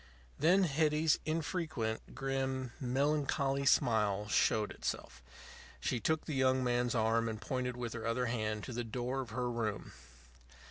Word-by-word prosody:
Then 180 +6 +5
Hetty's 155 0 +2
infrequent, 155 -8 -2
grim, 135 -2 -2
melancholy 140 +1 +1
smile 105 -5 +3
showed 105 0 +2
itself. 65 -1 -5 0.6
She 120 - -1
took 155 +8 0
the 155 - -3
young 130 -1 +3
man's 125 0 +1
arm 115 0 +2
and 110 -1 -4
pointed 125 +2 -2
with 120 -2 -4
her 115 -1 -4
other 125 +2 0
hand 110 -3 -2
to 130 - -6
the 120 +1 -2
door 125 +4 -2
of 125 - -7
her 125 +3 -2
room. 115 -4 -3
125 Hz, 145 wpm, -34 LUFS, 115-135 Hz, 0.6 s, Then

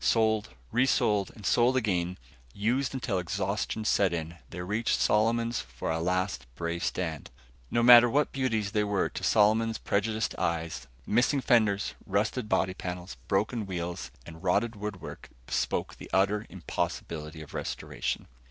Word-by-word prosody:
Sold, 110 -1 +2 0.2
resold 105 -6 +2
and 105 - -11
sold 125 +2 +4
again, 90 -6 0 0.4
used 125 +7 0
until 120 -7 -1
exhaustion 110 +4 -2
set 100 -4 +3
in, 85 0 -4
they 90 - -7
reached 105 +6 0
Solomon's 115 +2 +2
for 65 +3 -5
a 80 - 0
last 90 -5 -1
brave 85 +2 -3
stand. 80 -5 -2 0.4
No 120 - +1
matter 120 0 +9
what 145 +4 +2
beauties 115 -7 0
they 105 -1 +2
were 100 -2 0
to - - -7
Solomon's 110 +1 +3
prejudiced 110 +2 0
eyes; 85 -1 -2 0.2
missing 120 +6 +2
fenders, 110 -6 +2
rusted 105 +4 0
body 95 0 +2
panels, 90 0 -6
broken 105 +2 0
wheels 90 -1 -4 0.2
and 80 0 -11
rotted 110 +5 +1
woodwork 105 -2 -7 0.2
bespoke - - -1
the - - -11
utter 100 +3 +2
impossibility 80 -3 -4
of 75 - -14
restoration. - - -3
105 Hz, 145 wpm, -29 LUFS, 90-115 Hz, 0.4 s, matter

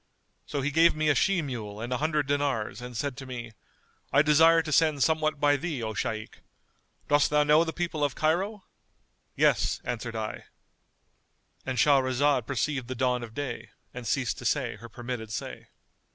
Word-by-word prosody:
So 145 - -2
he 145 +2 -1
gave 165 +2 +5
me 155 0 +1
a - - +5
she 180 +5 +2
mule 110 -7 -6
and 120 +3 -3
an 125 - -1
hundred 155 -1 0
dinars 135 -6 -1
and 125 -1 -7
said 140 +2 -2
to 135 - -8
me, 120 -3 -6 0.6
I 145 +2 +5
desire 160 +2 +5
to 155 - -5
send 155 -3 +3
somewhat 155 -2 +1
by 145 0 +3
thee, 145 -5 -4
O 110 0 -3
Shaykh! 110 +1 -4 0.7
Dost 145 0 +3
thou 150 0 +3
know 150 +2 +5
the 165 - -3
people 170 -3 -3
of 145 -2 0
Cairo? 190 +6 0 0.7
Yes, - - +2
answered 120 -1 -4
I;——And 110 - -10
Shahrazad 135 -1 +3
perceived 135 -1 -1
the 130 - -4
dawn 125 0 0
of 115 -1 -9
day 120 -5 -5 0.2
and 125 -2 -7
ceased 135 -3 -1
to 125 - -9
say 125 0 0
her 115 - -11
permitted 120 -1 -6
say. - - -6
140 Hz, 175 wpm, -27 LUFS, 120-150 Hz, 0.7 s, gave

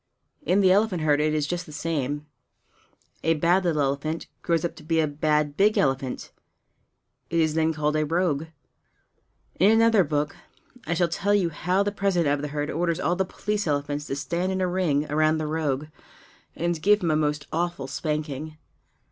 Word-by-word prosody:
In 200 -8 +2
the 185 -1 +5
elephant 195 -4 +2
herd 150 -1 +3
it 155 0 +2
is 150 -1 0
just 175 +3 -4
the - - -10
same; 145 -2 -2 1.0
a 165 0 +2
bad 175 +5 +2
little 155 -5 +1
elephant 140 +4 -2 0.2
grows 170 -1 0
up 170 - -3
to - - -12
be 160 +1 +1
a 160 - +3
bad 150 0 0
big 210 +4 +3
elephant; 135 -2 -1 1.0
it 170 - 0
is 160 -1 +2
then 160 0 +2
called 150 -1 -1
a 155 - +2
rogue. 160 -1 0 1.1
In 190 +4 +6
another 225 -2 +5
book 150 -1 -1 0.5
I 170 - 0
shall 175 +1 +2
tell 200 +5 +1
you 185 -4 +2
how 180 +5 0
the 205 - -1
President 185 -7 +1
of 145 - -2
the 150 - -3
herd 145 0 -3
orders 170 +1 -1
all 175 - +1
the 190 +1 0
police 210 +1 -3
elephants 145 0 -2
to 135 - -2
stand 170 +6 -2
in 190 - -1
a 185 - +1
ring 175 -5 +1
around 155 +1 +2
the 155 - -2
rogue 150 -2 -1 0.7
and 170 -1 -1
give 205 +2 +4
him 165 - +2
a - - +2
most 150 -1 0
awful 170 -2 -1
spanking. 150 +1 -4
160 Hz, 190 wpm, -25 LUFS, 150-175 Hz, 1.1 s, In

